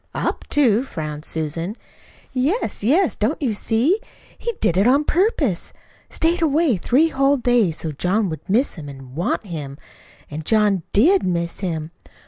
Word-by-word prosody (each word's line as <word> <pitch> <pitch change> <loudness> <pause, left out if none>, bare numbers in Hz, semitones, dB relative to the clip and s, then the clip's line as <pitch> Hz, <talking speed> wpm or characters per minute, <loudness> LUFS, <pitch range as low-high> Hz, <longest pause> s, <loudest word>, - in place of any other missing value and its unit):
"Up - - -2
to?" 245 -7 +3
frowned 155 - -6
Susan. 165 +5 -2 0.6
"Yes, 275 - -1
yes! 320 - +3
Don't 225 +9 -1
you 255 -7 0
see? 240 - +1 0.4
He 470 - -3
did 170 - +1
it 195 +4 +3
on 275 +4 +4
purpose 305 - 0 0.4
stayed 335 +2 0
away 310 -4 +3
three 275 - +2
whole 275 -1 +2
days, 240 -10 +2
so 160 - -4
John 190 +8 0
would 160 +4 -8
miss 240 +8 +2
him 150 -5 -8
an' 135 -2 -11
WANT 170 +7 -1
him. 150 -7 -6 0.5
An' 150 +2 -4
John 205 +1 +2
DID 345 - +4
miss 170 -2 -2
him. 160 -4 -3
215 Hz, 155 wpm, -21 LUFS, -, 0.6 s, on